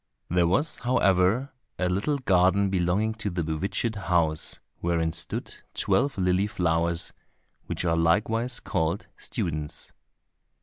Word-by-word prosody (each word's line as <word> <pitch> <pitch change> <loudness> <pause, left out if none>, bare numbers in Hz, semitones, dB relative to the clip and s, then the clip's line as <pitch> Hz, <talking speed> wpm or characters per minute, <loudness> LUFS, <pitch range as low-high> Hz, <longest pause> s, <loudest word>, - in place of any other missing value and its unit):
There 85 -1 +3
was, 145 - +1
however, 110 +2 +2 0.3
a 90 - 0
little 100 +11 0
garden 95 -4 +3
belonging 95 +4 +1
to 105 - -1
the 85 -2 -2
bewitched 95 +8 -1
house 85 -6 +1 0.2
wherein 85 -1 0
stood 85 0 -2 0.2
twelve 140 -4 +1
lily 90 +1 +2
flowers, 85 -4 0 0.5
which - - -3
are 85 -1 +2
likewise 110 +9 +1
called 85 -1 -1
students. 75 -3 -3
90 Hz, 120 wpm, -26 LUFS, 85-105 Hz, 0.5 s, There